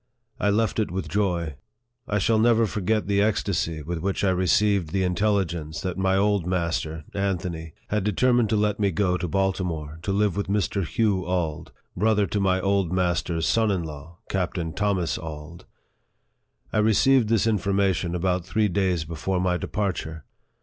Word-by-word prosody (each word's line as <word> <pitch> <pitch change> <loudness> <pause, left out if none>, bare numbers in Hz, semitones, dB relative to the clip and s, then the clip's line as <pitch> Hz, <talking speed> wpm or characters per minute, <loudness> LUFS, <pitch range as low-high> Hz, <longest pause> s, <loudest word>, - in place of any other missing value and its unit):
I 105 - +2
left 110 +1 +1
it 110 - 0
with 95 +2 -4
joy. 85 -8 -1 0.5
I 105 - 0
shall 110 +2 +2
never 115 0 +4
forget 105 +1 -1
the 100 0 +2
ecstasy 95 -7 0
with 85 +2 -4
which 95 +4 -2
I 95 - +3
re 90 0 0
ceived 100 -2 +3
the 95 +3 0
intelligence 90 -4 0
that 90 -2 -3
my 95 0 +1
old 100 -3 +1
master 85 -3 -2
(Anthony) 90 -5 -3
had 105 -1 0
determined 120 +3 +2
to 110 - +2
let 105 0 +1
me 100 -1 +2
go 95 0 +1
to 90 0 -2
Baltimore, 85 -4 -2
to 100 - -2
live 100 -2 +1
with 100 - -2
Mr. 100 -2 0
Hugh 105 -4 +1
Auld, 85 -4 -2 0.2
brother 105 +1 +2
to 105 - -2
my 95 -1 +2
old 100 -2 +1
master's 85 -2 0
son 110 -1 +2
in 95 -4 0
law, 80 +2 -9
Captain 90 -3 -2
Thomas 100 -5 0
Auld. 80 +1 -9 1.1
I - - +2
received 110 +3 +4
this 115 -2 +3
information 100 -5 +1
about 90 0 0
three 100 +4 +1
days 90 -4 0
before 85 +4 -2
my 90 0 +1
departure. 90 -5 -3
95 Hz, 170 wpm, -25 LUFS, 85-105 Hz, 1.1 s, never